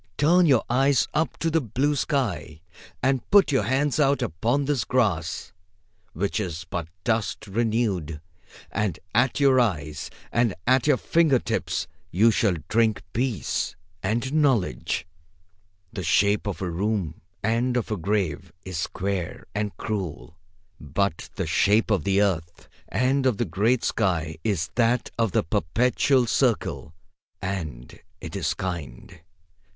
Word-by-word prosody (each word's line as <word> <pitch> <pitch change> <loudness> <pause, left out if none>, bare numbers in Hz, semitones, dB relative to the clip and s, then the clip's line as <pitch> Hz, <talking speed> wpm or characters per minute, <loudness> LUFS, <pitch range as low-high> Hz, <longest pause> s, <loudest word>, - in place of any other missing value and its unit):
Turn 170 +4 +5
your 130 -6 +4
eyes 130 -1 +3
up 155 +2 0
to 165 - -1
the 165 0 +2
blue 135 +5 0
sky, 120 - -1 0.4
and 135 -1 +2
put 200 -5 +6
your 135 - +3
hands 135 +5 +1
out 140 -1 +3
upon 120 - 0
this 135 -5 0
grass, 100 -10 0 0.6
which 100 +6 -1
is 90 -3 -4
but 85 -2 -4 0.2
dust 110 -2 -1
renewed, 105 -7 -1 0.5
and 105 -4 -1 0.2
at 125 +5 +2
your 135 -2 +5
eyes 80 - -1 0.2
and 115 -4 +2
at 130 +1 +3
your 145 -3 +5
fingers 155 -5 +1 0.2
you 110 +8 +4
shall 105 -4 +2
drink 110 -2 +2
peace 125 -2 -1 0.3
and 115 +8 -1
knowledge. 120 - +1 0.9
The - - -4
shape 100 +6 +2
of 100 -1 -3
a 90 - -2
room 95 -3 -2 0.2
and 120 +3 +1
of 115 - -2
a - - +1
grave 95 -4 -1
is 95 -3 -4
square 95 0 -3
and 105 0 -3
cruel, 95 -6 -4 0.4
but 80 +5 -2
the - - -2
shape 110 +3 +3
of 95 -7 +1
the 100 +1 +3
earth 85 -4 -2 0.2
and 130 +1 +1
of 120 -6 +1
the 120 - 0
great 115 +6 +1
sky 80 -7 0
is 95 -7 -1
that 120 +1 +1
of 115 -3 +2
the - - +2
perpetual 125 - +2
circle, 115 - 0 0.4
and 80 -11 -5 0.2
it 80 -3 -8
is - - -1
kind. 85 -2 -6
110 Hz, 140 wpm, -25 LUFS, 90-125 Hz, 0.9 s, put